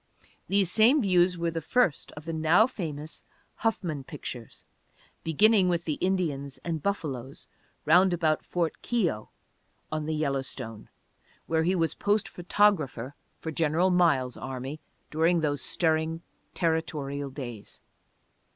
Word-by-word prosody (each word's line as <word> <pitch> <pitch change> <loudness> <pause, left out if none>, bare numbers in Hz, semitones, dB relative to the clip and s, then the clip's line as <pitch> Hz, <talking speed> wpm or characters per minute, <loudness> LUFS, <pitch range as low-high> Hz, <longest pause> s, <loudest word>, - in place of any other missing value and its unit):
These 195 -2 +2
same 230 +9 +5
views 180 -2 +3
were 170 0 -1
the 165 0 -3
first 180 - +1
of 150 +1 -10
the 165 - -4
now 160 +6 +4
famous 160 - -6 0.3
"Huffman 175 -10 -1
Pictures," 125 -4 -8 0.6
beginning 190 +4 +4
with 170 -1 0
the 150 -3 -2
Indians 155 -8 -1
and 165 -3 -2
buffaloes 140 -9 -4 0.4
round 180 +5 +5
about 160 -3 +1
Ft. 170 -2 -1
Keogh 180 - -1 0.6
on 155 -1 -2
the 160 - -1
Yellowstone 135 -6 -3 0.6
where 160 0 +1
he 180 +4 +2
was 165 -3 +1
post 205 0 +1
photographer 170 - +1 0.2
for 160 - -5
General 165 +4 +2
Miles' 145 -8 +2
army 130 +3 -5 0.3
during 165 +2 +2
those 145 -3 0
stirring 160 +1 0 0.3
territorial 150 -4 -1
days. 120 -6 -8
160 Hz, 125 wpm, -28 LUFS, 145-180 Hz, 0.6 s, same